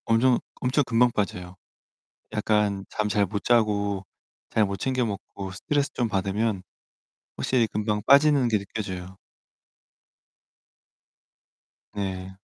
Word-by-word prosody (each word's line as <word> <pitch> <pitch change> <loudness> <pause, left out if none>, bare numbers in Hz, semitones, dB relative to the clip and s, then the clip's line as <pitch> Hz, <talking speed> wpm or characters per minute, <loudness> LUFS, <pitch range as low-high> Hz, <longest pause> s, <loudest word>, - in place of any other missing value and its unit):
엄청 120 +2 +3 0.2
엄청 130 +3 +2
금방 120 +1 +3
빠져요. 90 -4 -3 0.8
약간 105 -2 +1
잠 105 - -1
잘 105 -1 +2
못자고 100 -1 +1 0.5
잘 110 - +3
못 100 0 -3
챙겨 130 +1 0
먹고 100 -2 -6
스트레스 140 +8 -1
좀 120 - 0
받으면 100 0 -1 0.7
확실히 125 -3 +2
금방 105 0 -2
빠지는 140 -2 +6
게 110 -2 +2
느껴져요. 95 -2 -6 2.8
네. 95 -2 -4
105 Hz, 210 characters per minute, -26 LUFS, 100-120 Hz, 2.8 s, 빠지는